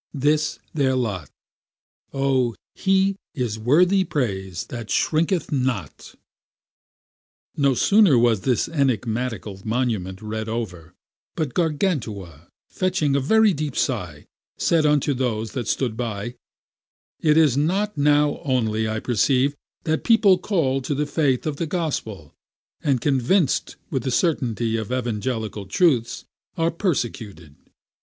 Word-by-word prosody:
This 150 +2 +1
is - - -20
their 135 -3 +1
lot; 100 - -2 0.8
O 135 -3 +1 0.2
he 195 0 +2 0.2
is 120 -6 -2
worthy 175 - +4
praise 95 - -3
that 115 -3 -6
shrinketh 165 +2 +1
not! 125 - -3 1.4
No 140 -2 +2
sooner 195 - +5
was 115 -4 +3
this 125 +1 +1
enigmatical 120 - -2
monument 110 -6 -2
read 110 +1 -5
over, 90 -8 -5 0.4
but 150 -6 -2
Gargantua, 120 - -2 0.2
fetching 180 -7 0
a - - +3
very 215 +9 +4
deep 150 -3 -4
sigh, 90 - -2 0.3
said 160 -3 +2
unto 150 -1 +2
those 115 -4 -2
that 120 -5 -4
stood 120 -3 -1
by, 115 -1 -4 0.9
It 155 0 +3
is 155 -6 +5
not 190 +9 0
now 145 0 +2
only, 110 -6 0
I 110 0 -2
perceive, 130 +5 +1 0.3
that 160 -1 -1
people 210 -5 +5
called 135 -9 0
to 145 - -1
the 150 +2 0
faith 145 -4 0
of 150 -2 -2
the 165 - -2
gospel, 135 - -4 0.5
and 135 -4 +2
convinced 140 +3 +1 0.2
with 135 - 0
the 130 - -2
certainty 120 - 0
of 110 +1 -5
evangelical 110 -4 -3
truths, 140 -11 +1 0.3
are 165 0 +1
persecuted. 115 - -3
130 Hz, 125 wpm, -23 LUFS, 110-155 Hz, 1.4 s, sooner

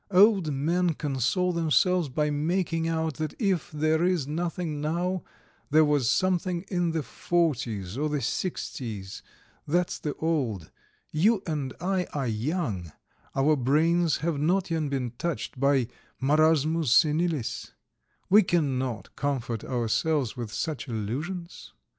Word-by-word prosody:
Old 195 -4 +5
men 165 +4 +1
console 145 +7 0
themselves 170 0 +2
by 150 +3 0
making 165 +2 0
out 160 -2 -1
that 155 -2 -3
if 195 - 0
there 155 +2 +1
is 180 -5 +2
nothing 165 0 -3
now, 175 +4 -1 0.5
there 155 +2 +5
was 145 -5 +2
something 180 +1 +1
in 175 -3 +1
the 160 -2 -1
forties 120 - -1
or 155 +1 0
the 150 -1 0
sixties; 115 - -4 0.5
that's 175 +3 0
the 150 - -3
old: 130 - -1 0.4
you 195 +6 +3
and 145 -5 -3
I 180 +1 0
are 140 -2 -1
young; 110 - -2 0.4
our 145 +3 +4
brains 160 +5 +2
have 165 -4 0
not 180 +4 +1
yet 160 -3 0
been 130 -4 -2
touched 135 -7 -3
by 135 -3 +3 0.3
marasmus 155 +2 +3
senilis; 155 -3 +2 0.5
we 210 +3 +7
cannot 130 - -1
comfort 125 -6 -2
ourselves 130 +2 0
with 120 -4 -5
such 150 +2 -3
illusions. 145 - -5
155 Hz, 130 wpm, -27 LUFS, 135-175 Hz, 0.5 s, we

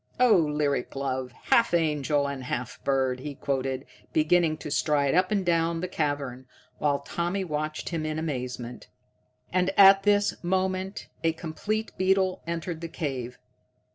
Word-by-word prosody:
'Oh 250 -3 +6
lyric 150 -6 0
love, 130 -2 -2
half 205 - +2
angel 150 -3 +1
and 135 -2 -5
half 125 -1 -4
bird!'" 130 -2 +1
he 145 +1 -6
quoted, 135 -1 -2 0.3
beginning 155 0 +3
to 150 - -7
stride 145 -2 +2
up 185 +2 +3
and 200 -3 0
down 165 -1 +1
the 180 - -2
cavern, 145 -6 -2 0.3
while 145 -1 +2
Tommy 175 +6 -2
watched 155 -2 -3
him 165 -2 -2
in 155 0 -2
amazement. 125 -5 -4 0.7
And 185 0 +2
at 195 0 +9
this 205 -1 +2
moment 190 +2 -1 0.2
a 165 0 +2
complete 205 +7 -3
beetle 190 0 +2
entered 170 0 -3
the 165 - -4
cave. 130 -6 -4
155 Hz, 145 wpm, -27 LUFS, 140-180 Hz, 0.7 s, at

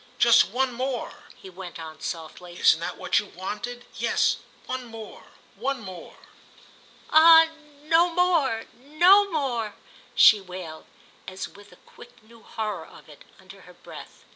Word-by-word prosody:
Just 235 -1 +6
one 255 +3 -1
more," 255 0 -5
he - - -14
went 185 -1 -10
on, 160 -1 -10
softly—"isn't 175 +1 -1
that 170 - -5
what - - +1
you 210 - -7
wanted? 240 +7 -7
Yes, - - +1 0.3
one 255 0 -5
more, 225 -2 -11 0.3
one 265 +6 -3
more." 185 -6 -11 0.9
"Ah 325 +1 +8 0.3
no 330 +3 +3
more—no 335 - +2
more!" 245 -9 -2 0.4
she 210 -2 +7
wailed, 180 -4 -10 0.4
as 190 0 -6
with 205 0 -17
a - - -16
quick 240 -1 -17
new 230 +1 -19
horror 210 -7 -5
of - - -17
it, 145 - -16
under 190 +1 -15
her 180 -1 -17
breath. - - -13
225 Hz, 140 wpm, -25 LUFS, 185-270 Hz, 0.9 s, Ah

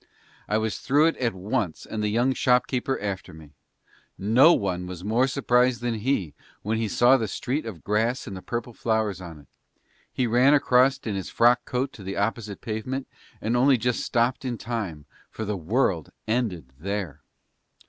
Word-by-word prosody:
I 105 - +1
was 110 -1 -2
through 145 +3 +3
it - - -5
at 115 -6 -1
once 100 -2 -2
and 110 - -4
the 105 - 0
young 120 +5 +2
shop 125 -1 +3
keeper 130 +1 -2
after 100 -5 -5
me. 80 -2 -14 0.7
No 120 - +6
one 90 - 0
was 90 -1 -7
more 115 +6 +2
surprised 125 -2 +2
than 120 -1 -1
he 105 - -1 0.3
when 110 +2 -1
he 115 - 0
saw 120 +5 +5
the 115 -3 -2
street 130 +7 -3
of 90 -8 -8
grass 115 +5 0
and 100 - -7
the 95 - -7
purple 120 +2 -4
flowers 110 -4 -1
on 85 -3 -9
it; - - -22 0.6
he 130 - 0
ran 125 +5 +5
across 130 -1 +4
in 115 -6 -5
his 95 -1 -4
frock 120 +1 +3
coat 130 +2 -2
on - - -17
to 100 - -11
the 95 +1 -5
opposite 105 0 -2
pavement 125 +5 -4 0.3
and 115 +2 0
only 130 +2 +5
just 120 +1 0
stopped 120 +2 0
in 125 -3 -3
time, 100 -10 -4 0.2
for 110 - -5
the 105 0 -2
world 95 - 0 0.2
ended 105 - -2
there. 100 -4 -4
115 Hz, 190 wpm, -25 LUFS, 100-125 Hz, 0.7 s, No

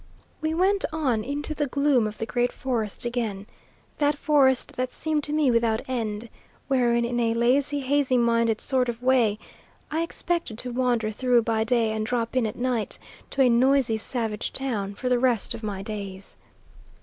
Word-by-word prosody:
We 315 +1 -1
went 385 +3 +2
on 265 -9 0
into 290 +5 -3
the 295 -1 -1
gloom 280 -4 +2
of 215 - -7
the 225 - -3
Great 245 +1 0
Forest 235 -5 -3
again; 225 -5 -2 0.5
that 290 0 +2
forest 275 -4 +2
that 255 0 -2
seemed 310 -2 -2
to 295 - -4
me 300 -4 +3
without 230 -1 +1
end, 225 -3 -3 0.4
wherein, 240 -3 +2
in 240 0 -1
a 230 -1 +1
lazy, 275 +5 +2
hazy 270 -1 +2
minded 230 -2 +2
sort 255 -2 +1
of 235 +1 -5
way, 245 -5 +3 0.5
I 320 +2 0
expected 335 -7 -3
to 250 +1 -3
wander 240 -3 0
through 245 +1 +2
by 220 -1 +1
day 230 -2 +2
and 220 0 -2
drop 230 +1 -2
in 250 -3 +2
at 210 - -5
night 245 -3 -2 0.3
to 270 - +2
a 250 - +5
noisy 245 -1 +3
savage 225 -1 -3
town 210 -7 -2
for 250 - -4
the 250 -1 +3
rest 245 -4 +1
of - - -7
my 200 -3 -4
days. 200 -2 -7
245 Hz, 180 wpm, -25 LUFS, 225-270 Hz, 0.5 s, a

